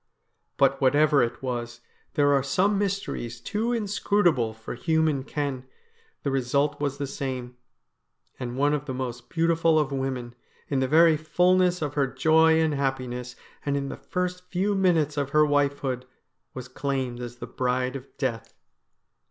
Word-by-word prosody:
But - - +3
whatever 145 +2 +4
it 120 +2 -2
was 120 -2 -4 0.2
— - - -39
there 145 -2 +4
are 140 - +3
some 190 +9 +1
mysteries 195 - -3
too 215 - -2
inscrutable 200 - +1
for 110 0 -8
human 160 +1 +1
ken 140 -3 -3 0.3
— 455 -1 -36
the 140 - 0
result 140 +3 0
was 140 -1 -1
the 145 - -2
same; 130 -2 -5 0.8
and 125 -1 -5
one 145 +2 +3
of 145 -1 -2
the 130 - -4
most 125 -2 -5
beautiful 165 -1 +2
of 150 -2 +1
women, 130 -3 -3 0.4
in 140 - +1
the 130 - +1
very 160 +2 +5
fulness 180 +2 +2
of 145 -2 -3
her 140 -2 +1
joy 160 +4 +4
and 160 -2 +2
happiness, 130 -3 -3 0.3
and 140 -1 0
in 140 -1 -3
the - - -5
first 180 0 -4
few 195 +3 0
minutes 165 -6 +2
of 140 -1 -1
her 150 - +7
wifehood, 140 -3 0 0.5
was 130 -1 -6
claimed 130 -2 -3
as 120 -1 -6
the - - -7
Bride 125 +1 -1
of 135 0 -7
Death. 120 -5 -3
140 Hz, 165 wpm, -26 LUFS, 130-160 Hz, 0.8 s, her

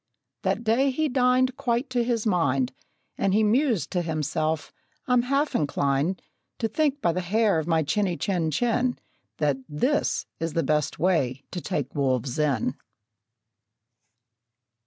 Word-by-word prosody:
That - - -1
day 240 +5 +3
he 310 +4 0
dined 255 0 +3
quite 250 0 0
to 245 -2 +1
his 235 -2 -1
mind; 140 - +1 0.5
And 195 0 +2
he 220 - +4
mused 225 - +2
to 180 - 0
himself, 155 -1 -2 0.3
"I'm 250 -1 +3
half 275 +4 0
inclined 145 +4 0 0.3
To 225 - 0
think, 290 +4 0
by 170 - +3
the 185 - -1
hair 205 0 +2
of 160 - -4
my 165 -2 +2
chinny, 180 +4 0
chin, 175 -5 0
chin, 245 - +1 0.4
That 145 -3 +1
this 250 - 0
is 165 -1 -2
the 165 - +1
best 150 -1 0
way 140 -6 +1
to 175 - -4
take 140 -4 -3
wolves 130 -2 0
in!" 135 -4 0
180 Hz, 145 wpm, -26 LUFS, 150-245 Hz, 0.5 s, he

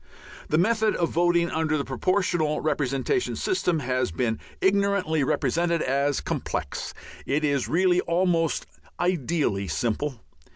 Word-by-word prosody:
The 155 - +2
method 220 +4 +2
of 170 - 0
voting 170 0 +2
under 160 -1 0
the 140 - -2
Proportional 165 +2 0
Representation 145 - 0
system 180 - 0
has 130 -2 0
been 110 +6 -1 0.2
ignorantly 195 -5 +2
represented 165 +6 +1
as 140 +1 +1
complex. - - -4 0.3
It 150 +3 +1
is 140 -3 0
really 180 +2 +3
almost 170 -2 +1 0.3
ideally 160 - 0
simple. 120 - -2
160 Hz, 120 wpm, -25 LUFS, 135-180 Hz, 0.3 s, really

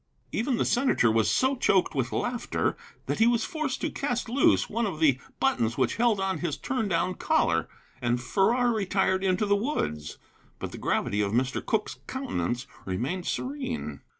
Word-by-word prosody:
Even 245 +1 0
the - - +1
senator 245 - +3
was 110 -2 +2
so 260 - +2
choked 195 -6 +2
with 130 -4 -1
laughter 245 -1 -1 0.3
that - - -2
he 225 - +6
was 235 -2 +2
forced 310 -5 -3
to - - -1
cast 245 -4 -2
loose 265 +4 +3
one 230 +1 -1
of 165 -6 -5
the 140 -5 +4 0.2
buttons 120 - +1
which 130 - +1
held 230 -3 +3
on 190 -3 -1
his 170 -3 -2
turn 250 -4 -2
down 180 0 +1
collar, 85 - +1 0.3
and 120 0 +1
Farrar 230 - +2
retired 190 -2 +1
into 190 +2 +2
the 205 0 +3
woods. 200 - -2 0.4
But - - -5
the - - -8
gravity 105 +1 0
of 100 0 -1
Mr. 130 +2 0
Cooke's 215 -1 -1
countenance 250 - -2 0.2
remained 130 - -3
serene. 260 -2 -3
195 Hz, 175 wpm, -27 LUFS, -, 0.4 s, he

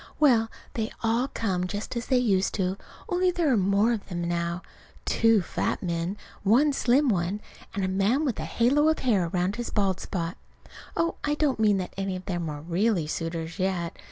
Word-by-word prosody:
Well, 240 -7 +4 0.2
they 220 -1 -2
all 230 +3 +2
come 185 -4 -1
just 205 +6 -5
as 235 -1 -3
they 260 - +3
used 200 -6 +2
to, 185 -1 0 0.3
only 360 0 +2
there 340 -6 +2
are - - +4
more 200 +3 +3
of 215 - -5
them 175 -2 -3
now 170 +1 -2 0.4
two 225 -4 +3
fat - - -2
men, 170 +2 -2 0.2
one 260 +9 +4
slim 270 +2 +3
one, 190 -2 0 0.4
and 195 -2 0
a - - 0
man 200 +10 +2
with 255 - -1
a - - -3
halo 280 +6 +3
of 315 - +2
hair 205 -9 +2
round 180 +6 -1
a 240 - -3
bald 195 -3 +1
spot. 170 -1 -3 0.6
Oh, 335 - +1
I 295 0 +1
don't 295 -5 +1
mean 210 -2 +4
that 185 -1 -4
any 195 -1 -2
of 185 0 -7
them 175 -4 -2
are 145 -1 -6
really 175 +2 +1
suitors 165 +2 -4
yet. 185 -3 -1
200 Hz, 195 wpm, -27 LUFS, 180-240 Hz, 0.6 s, Well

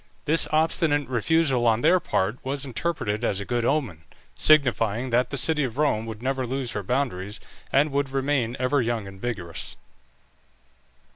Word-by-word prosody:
This 155 +2 +2
obstinate 155 -2 +2
refusal 130 +1 +1
on 115 0 +3
their 185 +7 +5
part 105 - -1
was 140 +1 -2
interpreted 120 -5 -2
as 100 -4 0
a 100 - -5
good 120 +1 -1
omen, 125 - -1 0.3
signifying 125 -5 +3
that 125 +2 +2
the 140 - -3
city 150 +3 +2
of 125 -2 -4
Rome 125 -7 +1
would 110 0 -7
never 130 -1 -1
lose 130 -1 -3
her 105 - -3
boundaries, 105 -3 -2 0.3
and 145 +2 +3
would 140 0 0
remain 135 -3 -1
ever 130 +2 +2
young 115 -3 -2
and 95 0 -12
vigorous. 95 -9 -3
130 Hz, 160 wpm, -25 LUFS, 115-145 Hz, 0.3 s, their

